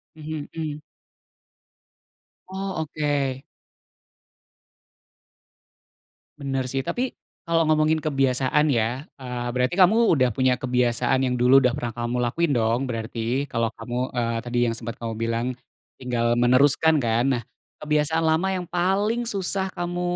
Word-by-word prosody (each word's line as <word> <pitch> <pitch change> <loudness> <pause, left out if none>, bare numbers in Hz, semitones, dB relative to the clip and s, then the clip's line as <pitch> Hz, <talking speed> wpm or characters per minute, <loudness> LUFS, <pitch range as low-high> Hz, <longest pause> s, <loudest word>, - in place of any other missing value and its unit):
Mhm, 155 -1 -6
mmm. 150 -2 -4 1.7
Oh 190 -2 -4
oke. 145 -3 -2 3.0
Bener 135 -2 -2
sih, 135 - -1
tapi 250 +1 -2 0.3
kalo 165 -1 +2
ngomongin 155 0 +3
kebiasaan 135 0 +1
ya, 120 +2 0 0.2
eee, 125 -1 -5
berarti 125 +5 0
kamu 205 +3 +5
udah 130 -5 +3
punya 130 +2 +2
kebiasaan 125 0 +1
yang 125 - 0
dulu 125 +2 +6
udah 125 -2 +2
pernah 120 -5 -3
kamu 120 +1 -3
lakuin 145 +6 0
dong, 115 +1 +1
berarti 115 +3 -3
kalo 115 0 +1
kamu, 120 0 -5 0.2
eee, 115 -1 0
tadi 120 0 -3
yang 115 - -2
sempet 115 0 -6
kamu 115 -1 -3
bilang 115 +1 -1 0.5
tinggal 120 -2 0
meneruskan 140 +6 +4
kan, 115 0 +1
nah 120 - -6 0.4
kebiasaan 150 +2 +1
lama 160 +4 +2
yang 180 -1 -3
paling 200 +7 0
susah 195 -3 -1
kamu 175 0 -3
135 Hz, 130 wpm, -24 LUFS, 120-160 Hz, 3.0 s, dulu